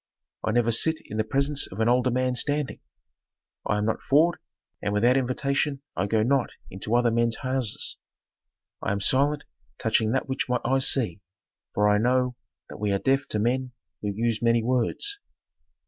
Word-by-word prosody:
I - - -1
never 115 +1 +2
sit 160 +8 +3
in 110 - -6
the 110 - +2
presence 140 +5 0
of 95 - -8
an 110 - +2
older 125 +1 +3
man 130 +1 0
standing; 145 +2 0 0.9
I 105 - +1
am 105 - 0
not 110 - -1
forward, 160 +5 +3 0.4
and 100 0 -1
without 120 +5 +4
invitation 140 +2 0
I 100 - 0
go 110 +1 +2
not 130 +1 +1 0.2
into 100 +5 -2
other 120 -1 +3
men's 115 0 +1
houses. 130 -4 -2 0.8
I - - 0
am 100 - -2
silent 140 +7 +2 0.3
touching 110 -1 +1
that 135 - 0
which 130 -1 -2
my 125 0 +1
eyes 135 0 +2
see, 105 -9 -1 0.5
for 105 0 +3
I 105 0 +4
know 125 +2 +1 0.3
that - - -10
we 105 -1 0
are 100 - +2
deaf 135 +6 +1
to - - -2
men 125 +4 0 0.3
who 105 - -2
use 115 +2 -1
many 115 -1 +3
words. 130 - 0
125 Hz, 180 wpm, -26 LUFS, 110-135 Hz, 0.9 s, without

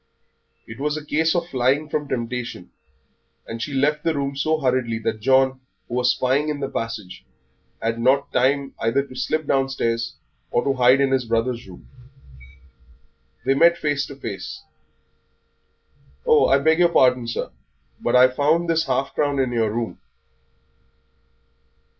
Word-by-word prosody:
It 115 +3 -10
was 150 +2 -1
a 150 - -8
case 160 +2 +1
of 170 -1 -1
flying 135 +3 +1
from 150 -1 -3
temptation, 120 -6 -4 0.7
and 115 0 -7
she 145 - -4
left 150 +3 +1
the 165 -1 0
room 140 -1 -2
so 155 +3 0
hurriedly 125 -4 0
that 110 0 -3
John, 130 +2 +3 0.3
who - - -9
was 125 0 +2
spying 135 +4 +1
in 150 -1 -3
the 135 - -2
passage, 110 -5 -5 0.6
had 115 +1 -2
not 135 +4 +2
time 135 +2 +1
either 115 +5 +1
to 130 - -13
slip 155 +5 -1
downstairs 130 -4 -1 0.3
or 120 - +1
to 140 - +1
hide 130 +1 +4
in 135 -1 +2
his 130 -2 +1
brother's 115 +1 -1
room. 65 -10 -14 1.6
They 135 - +3
met 170 +4 +5
face 145 -4 -1
to 140 - -9
face. 110 -7 -7 1.6
"Oh, 155 - +5
I 135 - +4
beg 160 +4 +2
pardon, 125 -5 +3
sir, 115 - -4 0.5
but 120 - 0
I 125 +1 +8
found 150 +6 +1
this 165 0 +1
half 135 +1 -1
crown 145 -1 0
in 130 -2 0
your 115 -3 0
room." 115 +1 -4
130 Hz, 155 wpm, -22 LUFS, 120-145 Hz, 1.6 s, I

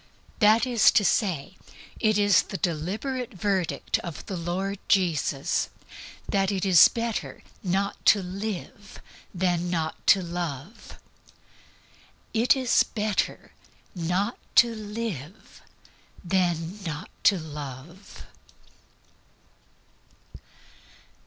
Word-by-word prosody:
That 220 +1 +5
is 240 -5 +5
to 205 - +4
say, 190 -3 0 0.4
it 215 -3 +2
is 205 -4 +5
the 195 - -6
deliberate 215 - -3
verdict 190 -2 -1
of 170 -4 -8
the 190 - -5
Lord 185 +3 -3
Jesus 160 -7 +1 0.6
that 195 0 +1
it 195 -1 -1
is 180 -4 +8
better 230 -1 -4 0.2
not 195 +1 -2
to 200 -2 +6
live 200 +1 -6 0.3
than 175 -1 0
not 160 -2 -3
to 195 -2 +6
love. 170 - -6 1.4
_It 230 +4 +4
is 255 -3 +3
better 210 -2 -2 0.4
not 180 +6 -1 0.2
to 235 -1 +6
live 210 - -7 0.6
than 175 +1 -1
not 165 +1 -6
to 200 - +6
love. 150 +3 -9
190 Hz, 95 wpm, -26 LUFS, 170-210 Hz, 1.4 s, is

